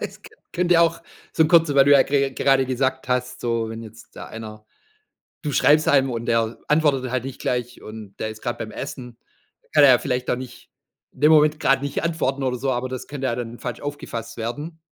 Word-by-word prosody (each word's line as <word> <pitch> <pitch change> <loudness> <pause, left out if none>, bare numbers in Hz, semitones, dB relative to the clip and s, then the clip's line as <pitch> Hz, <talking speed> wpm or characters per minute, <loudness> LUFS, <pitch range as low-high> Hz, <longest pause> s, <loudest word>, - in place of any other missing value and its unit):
Es - - -7
könn 435 -1 -16
könnte 175 -1 +3
auch 165 0 +2 0.3
so 160 - +3
kurz 165 -2 +4
weil 135 -1 +6
du 145 - +5
ja 140 - +7
ge 140 -1 0
gerade 135 -1 +2
gesagt 130 0 -1
hast, 125 0 -2
so: 115 -2 -1
„Wenn 115 0 -7
jetzt 110 0 -14
da - - -8
einer” 110 -1 -10 0.8
du 150 - -2
schreibst 155 +3 +4
einem 135 -2 +4
und 115 0 -4
der 115 -1 0
antwortet 145 -5 +2
halt 130 -1 -2
nicht 135 -1 -7
gleich 125 -1 -3
und 110 -2 -10
der 110 - -2
ist 110 0 -10
grad 120 -1 -3
beim 110 -2 -6
Essen, 125 -4 -7 0.4
da - - -33
kann 150 -2 +6
er 135 - +8
ja 125 - +6
vielleicht 125 -2 -2
auch 125 - 0
nicht 125 -1 -10 0.4
in - - -18
dem 150 +1 +6
Moment 150 0 +4
grad 135 -2 +2
nicht 140 +1 -3
antworten 160 -5 -1
oder 125 -1 -1
so, 135 +2 -1
aber 125 +1 -2
das 130 -1 -6
könnte 135 -2 -4
ja 120 - -1
dann 120 -1 -6
falsch 125 -2 -6
aufgefasst 115 -6 -6
werden 145 +9 -5
130 Hz, 225 wpm, -22 LUFS, 120-145 Hz, 0.8 s, er